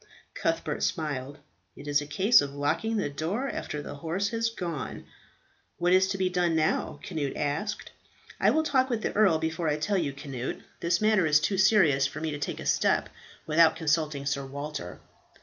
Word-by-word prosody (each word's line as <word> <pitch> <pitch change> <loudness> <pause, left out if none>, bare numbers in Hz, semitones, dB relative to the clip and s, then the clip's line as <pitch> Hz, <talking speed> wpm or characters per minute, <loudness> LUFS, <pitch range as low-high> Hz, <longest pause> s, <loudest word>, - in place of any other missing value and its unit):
Cuthbert - - -2
smiled, 145 -4 -2 0.4
"It - - -11
is 145 0 +2
a 145 - -7
case 195 +10 +5
of 140 -1 -5
locking 210 +11 0
the 205 - 0
door 165 - -2
after 150 - -4
the - - -7
horse 165 +7 -2
has 230 0 0
gone." 170 - -5 0.7
"What 175 +1 +2
is 190 0 +5
to 195 0 -2
be 190 -1 +1
done 180 -2 +1
now?" 155 0 0
Cnut 155 -8 -3
asked. 160 +9 -3 0.5
"I - - +4
will 315 - +2
talk 265 -4 +2
with 230 -3 -2
the - - -1
earl 200 -6 +4
before 160 0 -2
I 150 - 0
tell 195 +6 0
you, 150 -5 -1
Cnut. 135 -3 -5 0.2
This 170 +2 +1
matter 215 -5 +3
is 150 0 +5
too 190 +4 0
serious 170 -9 +4
for - - -7
me 160 0 -2
to 145 - -5
take - - -3
a - - -7
step - - +2 0.4
without 160 +1 +4
consulting 155 -3 0
Sir 140 0 -1
Walter." 140 - -6
160 Hz, 190 wpm, -28 LUFS, 145-195 Hz, 0.7 s, case